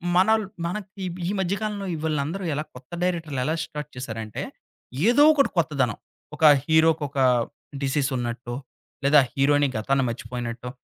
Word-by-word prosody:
మనల్ 220 +4 +4 0.2
మనకి 195 +2 -5 0.2
ఈ - - 0
మధ్య 190 +1 0
కాలంలో 205 -2 -3
ఈ - - -2
విళ్ళందరూ 155 +5 -1
ఎలా 150 +2 -2
కొత్త 125 +3 -14
డైరెక్టర్లు 165 -7 -1
ఎలా 160 +2 0
స్టార్ట్ 150 -1 -7
చేశారంటే, 110 -4 -5 0.7
ఏదో 285 +4 +6
ఒకటి 275 -2 +3
కొత్తదనం. 135 -8 0 0.4
ఒక - - -6 0.2
హీరోకొక 160 -3 +2 0.6
డిసీస్ 135 0 0
ఉన్నట్టు, 120 0 -4 0.5
లేదా 145 +1 +7
హీరోయిని 145 0 +3
గతాన్ని 135 +4 +1
మర్చిపోయినట్టు, 120 0 -5
145 Hz, 135 wpm, -25 LUFS, 125-175 Hz, 0.7 s, లేదా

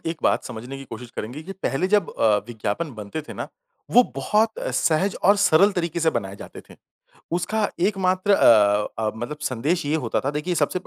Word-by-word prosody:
एक 165 +1 -2
बात - - +2
समझने 120 +3 -7
की 135 - -9
कोशिश 120 +1 -8
करेंगे 125 +8 -5
कि 190 +4 -7
पहले 185 -2 -1
जब 205 -3 +2
अ, 110 -2 +2
विज्ञापन 120 +7 -3
बनते 105 +7 -6
थे - - -10
ना, - - -5 0.4
वो 245 - +7
बहुत 220 +1 +1 0.2
सहज 185 +5 +1
और 200 +2 +6
सरल 200 0 +4
तरीके 170 -2 -2
से 160 -1 +3
बनाए 95 0 -4
जाते - - -10
थे। - - -12 0.6
उसका 205 +5 0
एक 195 +2 +1
मात्र 185 +2 +1
अ 105 - +5
अ, 110 -1 0
मतलब 120 +7 -5
संदेश 145 +5 -1
ये 150 - +1
होता 125 -8 -1
था। 140 - -1
देखिए 150 +4 -2
सबसे 185 - 0
155 Hz, 200 wpm, -23 LUFS, 120-185 Hz, 0.6 s, वो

